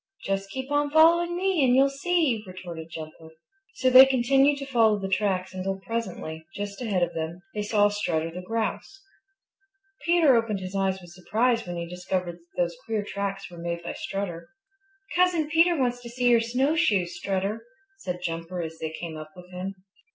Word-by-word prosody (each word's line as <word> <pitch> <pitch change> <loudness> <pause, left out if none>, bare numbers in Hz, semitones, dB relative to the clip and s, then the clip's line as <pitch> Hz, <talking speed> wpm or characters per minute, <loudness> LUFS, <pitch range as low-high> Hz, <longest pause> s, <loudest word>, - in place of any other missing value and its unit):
"Just 195 0 -2
keep 265 +6 -6
on 290 0 +2
following 340 +3 +5
me 370 -4 +2
and 250 -1 +4
you'll 270 +1 +6
see," 280 -6 +1
retorted 175 -3 -8
Jumper. 160 0 -9 0.5
So 255 -1 +2
they 260 +1 +10
continued 270 +2 +3
to 275 - -5
follow 225 -5 +3
the 195 -1 -4
tracks 190 -1 0
until 190 +1 -3
presently, 190 -7 -5
just 205 +2 -5
ahead 200 -7 +1
of 175 - -1
them, 165 +3 -5
they 210 - -2
saw 205 0 +3
Strutter 165 -6 -1
the 180 +2 -6
Grouse. 225 - -3 1.0
Peter 335 -6 +5
opened 225 -3 +1
his 185 +1 -6
eyes 190 -1 0
with 175 -2 -14
surprise 230 +5 0
when 175 0 -4
he 170 0 -4
discovered 180 0 -3
that 175 +1 -2
those 170 -1 -4
queer 220 -2 -2
tracks 200 -2 -4
were 175 - -10
made 170 0 -4
by 170 - -4
Strutter. 190 -4 -5 0.7
"Cousin 355 -3 +3
Peter 335 +1 +4
wants 245 -2 0
to 240 - -9
see 245 +1 +1
your 235 -1 +5
snowshoes, 235 - +1
Strutter," 195 +4 -2 0.4
said 180 - -4
Jumper 165 +2 -4
as 160 0 -7
they 160 - -3
came 165 -2 -6
up 155 0 -8
with 180 0 -13
him. 185 +2 -5
200 Hz, 180 wpm, -26 LUFS, 180-255 Hz, 1.0 s, they